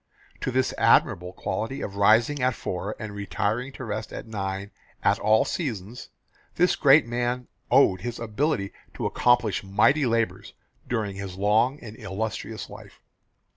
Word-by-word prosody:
To - - -2
this 130 0 +1
admirable 90 +1 +3
quality 115 +7 -4
of 100 - -5
rising 115 +8 +4
at 125 -1 +2
four 95 +4 -4
and 110 -2 -6
retiring 105 +5 -2
to 130 - -7
rest 110 0 -4
at - - -7
nine 100 -2 -4 0.3
at - - +3
all 110 +1 +4
seasons, 115 - -4 0.5
this - - +3
great - - +6
man 120 +1 -2 0.2
owed 95 -1 +4
his 120 +2 -4
ability 115 -1 -1 0.2
to - - -4
accomplish 115 -5 +2
mighty 115 +9 +3
labours 115 -1 -1 0.4
during 105 -5 -2
his 95 -2 -6
long 110 +7 +2
and 110 -2 -9
illustrious 110 +1 -5
life. - - -13
110 Hz, 145 wpm, -25 LUFS, 100-120 Hz, 0.5 s, great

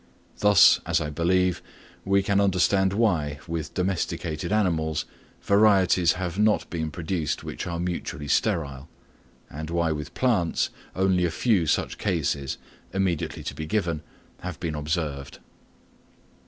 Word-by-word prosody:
Thus, 105 -4 +6
as - - +1
I 75 -1 -3
believe, 90 +3 +1 0.4
we 100 0 +3
can 100 0 +2
understand 95 0 +3
why, 90 -9 +1
with 80 -2 -4
domesticated 90 -3 -2
animals, 80 -7 +1 0.4
varieties 100 -4 +4
have 90 +1 -4
not 105 0 +3
been 80 -2 -2
produced 80 +1 -3
which - - -5
are 85 -1 -3
mutually 85 -4 -4
sterile; 70 -7 0 0.6
and 80 +2 -7
why 85 -1 +1
with 75 +2 -5
plants 110 -10 +1 0.2
only 95 -1 +2
a 85 - +2
few 90 0 +1
such - - 0
cases, 70 -8 -1 0.3
immediately 95 -5 -1
to - - -4
be 80 - -6
given, 85 -6 -1 0.4
have 90 -3 -6
been 80 -3 -3
observed. 75 -2 -3
85 Hz, 130 wpm, -25 LUFS, 80-95 Hz, 0.6 s, Thus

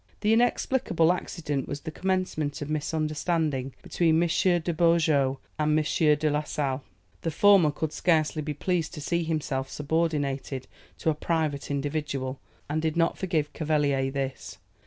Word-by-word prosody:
This 210 +1 +2
inexplicable 225 -7 +2
accident 150 -6 -3
was 140 0 -5
the 160 - -6
commencement 180 -5 -1
of 150 -1 -5
misunderstanding 155 -2 -1
between 165 -2 +2
M. 170 +2 +3
de 175 0 +1
Beaujeu 155 -5 +3 0.2
and 150 0 +3
M. 155 - +1 0.3
de 155 +1 +1
la 150 +1 +1
Sale. 140 -2 -2 0.4
The 165 - -1
former 195 0 +5
could 150 +1 -3
scarcely 155 -3 +1
be 150 0 -4
pleased 175 +1 -1
to - - -6
see 170 +3 0
himself 150 -5 -2
subordinated 145 -4 -1 0.3
to 160 - +1
a - - 0
private 155 -2 -1
individual, 140 -2 -2 0.3
and 155 +2 -1
did 160 0 -1
not 165 0 +2
forgive 160 -6 -1
Cavelier 145 -4 +1
this. 135 -7 -4
155 Hz, 150 wpm, -27 LUFS, 145-165 Hz, 0.4 s, former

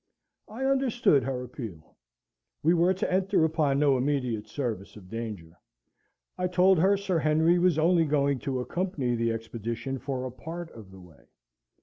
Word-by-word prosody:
I 240 +5 -5
understood 260 - +3
her 130 -2 -3
appeal. 110 - -9 0.7
We 165 +3 +4
were 175 +1 +3
to 185 - -2
enter 185 -3 +2
upon 155 -4 +1
no 140 -3 +3
immediate 125 -5 -1
service 115 -8 -4
of 95 -4 -14
danger; 105 -8 -6 0.8
I 180 - +1
told 180 0 +4
her 195 +4 +4
Sir 190 -4 -1
Henry 160 +3 +3
was 175 -3 +3
only 165 +1 +3
going 140 -2 +1
to 130 -1 -2
accompany 155 -4 -2
the 115 0 0
expedition 115 +3 -4
for 130 -1 -4
a 130 - -5
part 165 +6 -8
of 110 -4 -12
the 95 0 -13
way. 85 -7 -18
140 Hz, 160 wpm, -27 LUFS, 115-175 Hz, 0.8 s, We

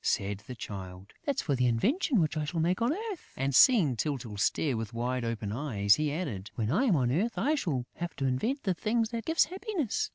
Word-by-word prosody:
said 100 0 0
the 125 - -6
Child. 95 -3 -8
"That's 280 -2 0
for 145 - 0
the 125 -1 +2
invention 245 - +2
which 155 -1 0
I 155 - -1
shall 165 +3 -3
make 175 +5 +1
on 235 +3 +3
earth." 410 +1 -5
And, 135 +1 0
seeing 170 - +6
Tyltyl 125 -4 -3
stare 130 +6 +1
with 115 0 -5
wide 125 +1 -1
open 115 -3 -3
eyes, 105 -5 +2
he 150 +2 0
added: 125 - -4
"When 110 -1 -1
I 215 - +2
am 215 -9 +4
on 125 -4 +1
earth, 210 - 0
I 295 - +2
shall 155 - -1
have 175 0 -4
to 135 - -2
invent 220 - 0
the 190 - +1
thing 225 +6 0
that 230 -1 -4
gives 325 +1 +3
happiness.... 385 - -2
150 Hz, 225 wpm, -30 LUFS, -, -, seeing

